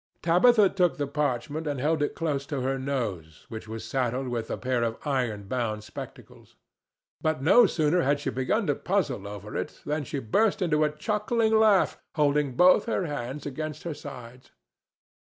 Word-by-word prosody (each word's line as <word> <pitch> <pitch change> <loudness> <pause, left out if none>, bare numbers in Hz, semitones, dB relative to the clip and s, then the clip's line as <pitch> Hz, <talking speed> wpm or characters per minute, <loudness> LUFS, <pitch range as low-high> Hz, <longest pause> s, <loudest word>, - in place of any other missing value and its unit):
Tabitha 200 +6 +5
took 180 -3 +1
the 145 - -1
parchment 145 +2 -2
and 145 -3 -2
held 155 +3 +1
it 145 - -1
close 145 -4 -2
to 140 -4 -3
her 135 +1 -1
nose, 105 - -4
which 110 -1 -7
was 110 0 -6
saddled 130 0 -1
with 115 -2 -3
a - - -2
pair 125 -1 -1
of 115 -1 -1
iron 125 -8 -1
bound 110 -1 -3
spectacles. 105 - -11 0.7
But 155 -4 -1
no 230 - +7
sooner 160 +1 +1
had 145 0 +1
she - - -3
begun 130 - 0
to 145 - +2
puzzle 140 - -1
over 105 +1 -8
it - - -4
than 150 0 -1
she 145 - -5
burst 190 - +1
into 155 -5 +2
a 150 - +3
chuckling 210 +8 0
laugh, 215 -3 +4 0.2
holding 145 -3 +1
both 185 +6 +5
her 210 -5 -1
hands 145 -2 -5
against 155 +2 -5
her 170 - -3
sides. 125 -4 -11
145 Hz, 175 wpm, -27 LUFS, 125-165 Hz, 0.7 s, no